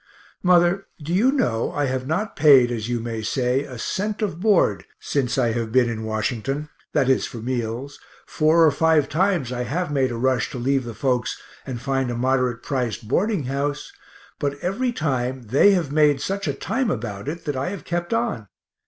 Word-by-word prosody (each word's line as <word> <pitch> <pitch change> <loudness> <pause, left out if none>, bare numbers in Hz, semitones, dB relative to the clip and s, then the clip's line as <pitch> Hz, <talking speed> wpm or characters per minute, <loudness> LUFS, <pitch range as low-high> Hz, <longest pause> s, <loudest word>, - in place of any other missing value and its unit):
Mother, 180 +1 +3
do 155 +3 -4
you 225 +9 +4
know 175 - 0
I 145 - 0
have 130 -1 -2
not 200 +9 -2
paid, 135 -5 +6
as 115 -1 -3
you 120 -1 0
may 115 -1 -4
say, 125 +5 0
a 130 -4 -9
cent 210 - -2
of 180 -6 -2
board 205 -1 +3 0.2
since 135 -3 -1
I 120 -3 +2
have 115 -1 -3
been 125 0 +4
in 110 -2 -3
Washington, 115 +7 -2 0.2
that 140 -4 +2
is 130 - +2
for - - -9
meals 120 +3 -4 0.3
four 160 +2 +3
or 155 - +5
five 160 0 +3
times 175 -7 +1
I 125 -1 -3
have 150 +7 -2
made 135 -3 +1
a 120 - -4
rush 130 -1 +1
to - - -4
leave 130 +1 0
the 115 -2 -7
folks 125 +1 -1 0.3
and 125 -3 -4
find 135 0 -1
a 120 - -3
moderate 125 -1 0
priced 125 -6 -2
boarding 195 - +1
house, 140 +3 -3 0.5
but 140 0 -1
every 230 +8 0
time 130 - -2
they 135 - +4
have 170 -7 0
made 150 -2 +4
such 195 +4 -3
a 145 - 0
time 255 - -1
about 105 - -4
it 165 +3 -5
that 145 -2 -2
I 130 +6 -2
have 200 -1 -7
kept 175 0 -3
on. 230 - -1
135 Hz, 195 wpm, -23 LUFS, 120-165 Hz, 0.5 s, paid